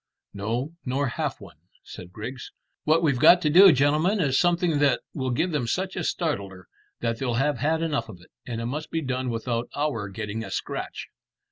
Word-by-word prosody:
"No, 115 Hz, +8 st, -3 dB
nor 135 Hz, +1 st, -1 dB
half -, -, -3 dB
one," -, -, -13 dB, 0.3 s
said 90 Hz, -1 st, -11 dB
Griggs. 115 Hz, +6 st, -7 dB, 0.3 s
"What 160 Hz, +2 st, +3 dB
we've 140 Hz, -6 st, +2 dB
got 175 Hz, -, +8 dB
to 150 Hz, -, +2 dB
do, 190 Hz, +3 st, +9 dB
gentlemen, 150 Hz, +8 st, +2 dB
is 135 Hz, -6 st, +2 dB
something 175 Hz, -3 st, +2 dB
that 145 Hz, -1 st, +3 dB
will 130 Hz, -3 st, -2 dB
give 165 Hz, +9 st, 0 dB
them 145 Hz, -7 st, -1 dB
such 190 Hz, +9 st, -2 dB
a -, -, -2 dB
startler 100 Hz, -, -3 dB, 0.3 s
that 115 Hz, -1 st, -1 dB
they'll 125 Hz, -3 st, -1 dB
have 135 Hz, +1 st, +1 dB
had 160 Hz, +4 st, +1 dB
enough 145 Hz, -8 st, -1 dB
of 95 Hz, -5 st, -10 dB
it; 90 Hz, -, -20 dB
and 115 Hz, -2 st, -5 dB
it 115 Hz, -, -3 dB
must 150 Hz, +6 st, -4 dB
be 165 Hz, -, -2 dB
done 130 Hz, -2 st, -2 dB
without 115 Hz, 0 st, -2 dB
our 130 Hz, -9 st, -2 dB
getting 105 Hz, +2 st, -5 dB
a -, -, -7 dB
scratch." -, -, -5 dB
130 Hz, 200 wpm, -25 LUFS, 115-155 Hz, 0.3 s, do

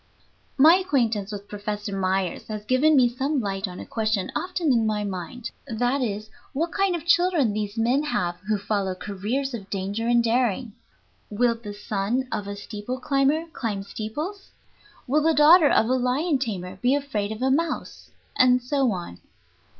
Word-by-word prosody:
My 315 Hz, +6 st, +8 dB
acquaintance 230 Hz, -, 0 dB
with 205 Hz, -1 st, -7 dB
Professor 205 Hz, 0 st, -4 dB
Myers 190 Hz, -1 st, -1 dB
has 215 Hz, -1 st, -6 dB
given 280 Hz, +6 st, +4 dB
me 255 Hz, -3 st, +6 dB
some 270 Hz, +4 st, -1 dB
light 195 Hz, -2 st, -2 dB
on 180 Hz, -1 st, -8 dB
a -, -, -7 dB
question 215 Hz, -4 st, -1 dB
often 360 Hz, -6 st, 0 dB
in 225 Hz, -2 st, +2 dB
my 210 Hz, -1 st, 0 dB
mind; 195 Hz, +4 st, -5 dB, 0.2 s
that 245 Hz, +3 st, 0 dB
is, 215 Hz, -2 st, -3 dB, 0.2 s
what 330 Hz, +4 st, -1 dB
kind 390 Hz, -2 st, +1 dB
of 335 Hz, -, -6 dB
children 345 Hz, -, +3 dB
these 210 Hz, +1 st, -3 dB
men 240 Hz, +5 st, +2 dB
have 175 Hz, -11 st, -1 dB
who 215 Hz, -1 st, +2 dB
follow 200 Hz, -2 st, -1 dB
careers 215 Hz, +9 st, -3 dB
of 200 Hz, -4 st, -7 dB
danger 200 Hz, +4 st, -2 dB
and 240 Hz, 0 st, +4 dB
daring. 235 Hz, -1 st, 0 dB, 0.6 s
Will 235 Hz, +3 st, +2 dB
the 220 Hz, -3 st, -9 dB
son 210 Hz, +5 st, -2 dB
of 210 Hz, -2 st, -3 dB
a 200 Hz, -, -4 dB
steeple 210 Hz, +5 st, -6 dB
climber 275 Hz, +4 st, +1 dB
climb 205 Hz, -5 st, -3 dB
steeples? 295 Hz, -, -6 dB, 0.6 s
Will 290 Hz, +4 st, +2 dB
the 320 Hz, +1 st, +3 dB
daughter 305 Hz, +1 st, +7 dB
of -, -, +4 dB
a 255 Hz, -, +2 dB
lion 260 Hz, +4 st, +1 dB
tamer 190 Hz, -7 st, -4 dB
be 255 Hz, +3 st, +3 dB
afraid 225 Hz, -8 st, -2 dB
of 220 Hz, +3 st, -4 dB
a 265 Hz, -, +3 dB
mouse? 325 Hz, +4 st, -2 dB, 0.3 s
And 250 Hz, 0 st, +5 dB
so 265 Hz, +1 st, +1 dB
on. 175 Hz, -, -6 dB
230 Hz, 175 wpm, -25 LUFS, 205-275 Hz, 0.6 s, My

